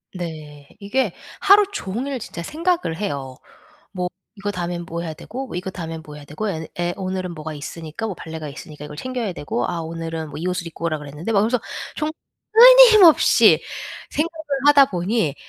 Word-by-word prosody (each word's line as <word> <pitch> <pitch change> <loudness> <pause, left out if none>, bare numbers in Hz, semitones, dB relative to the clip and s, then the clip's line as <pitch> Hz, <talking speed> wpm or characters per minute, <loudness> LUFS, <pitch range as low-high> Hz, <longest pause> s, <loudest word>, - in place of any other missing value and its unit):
네. 155 -5 -7
이게 205 +1 0 0.3
하루 410 +1 +7
종일 260 - -4
진짜 170 -6 -7
생각을 335 - -1
해요. 140 -10 -4 0.6
뭐 180 -1 -2 0.3
'이거 200 +1 -3
다음에는 175 -2 -4
뭐 170 +1 -4
해야 165 -2 -4
되고 250 +7 -7
이거 180 +2 -3
다음에는 165 -3 -6
뭐 150 - -11
해야 145 - -11
되고 155 +9 -4
애 160 -4 -4
애 175 0 -1
오늘은 185 -2 -3
뭐가 155 0 -6
있으니까 160 +7 -6
뭐 200 - -4
발레가 160 -3 -7
있으니까 150 +1 -9
이걸 150 - -10
챙겨야 235 -1 -3
되고 135 -6 -2
아 170 - -2
오늘은 165 -1 -5
뭐 145 - -7
이 170 - -4
옷을 180 -1 -2
입고 165 0 -5
오라고 155 -2 -2
그랬는데.' 150 +8 -6
막 200 - +4
이러면서 230 +3 +1 0.4
정 305 0 -1 0.4
끊임없이 460 -7 +8 0.5
생각을 315 +1 -2 0.2
하다 280 -2 +8
보니 175 -4 0
175 Hz, 375 characters per minute, -22 LUFS, 160-235 Hz, 0.6 s, 끊임없이